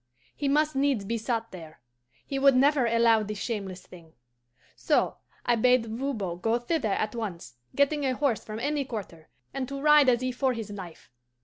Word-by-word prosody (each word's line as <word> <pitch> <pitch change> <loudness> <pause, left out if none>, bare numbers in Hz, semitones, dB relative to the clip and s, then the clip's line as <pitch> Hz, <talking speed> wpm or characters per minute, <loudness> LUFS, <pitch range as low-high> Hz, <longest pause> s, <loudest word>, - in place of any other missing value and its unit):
He 285 - -2
must 300 +1 +2
needs 270 -6 +1
be 230 +3 -2
sought 230 0 -2
there: 165 -4 -11 0.5
he 275 - -3
would 275 -1 +5
never 275 -1 +4
allow 230 -1 +4
this 210 0 -5
shameless 195 -4 -5
thing. 165 -3 -15 0.6
So - - +1 0.3
I 240 - +3
bade 250 +1 +3
Voban 220 -7 -4
go 225 +5 +1
thither 240 -3 -1
at 215 +1 -1
once, 185 - -6 0.2
getting 285 +1 +2
a 260 -2 0
horse 270 -5 0
from 215 0 -7
any 290 +3 -1
quarter, 195 -10 -8 0.2
and 260 -2 -3
to 275 +1 -5
ride 300 -1 +6
as 245 0 +2
if 255 -1 -2
for 265 -1 +1
his 225 -3 -6
life. 185 -9 -10
235 Hz, 185 wpm, -27 LUFS, 210-275 Hz, 0.6 s, ride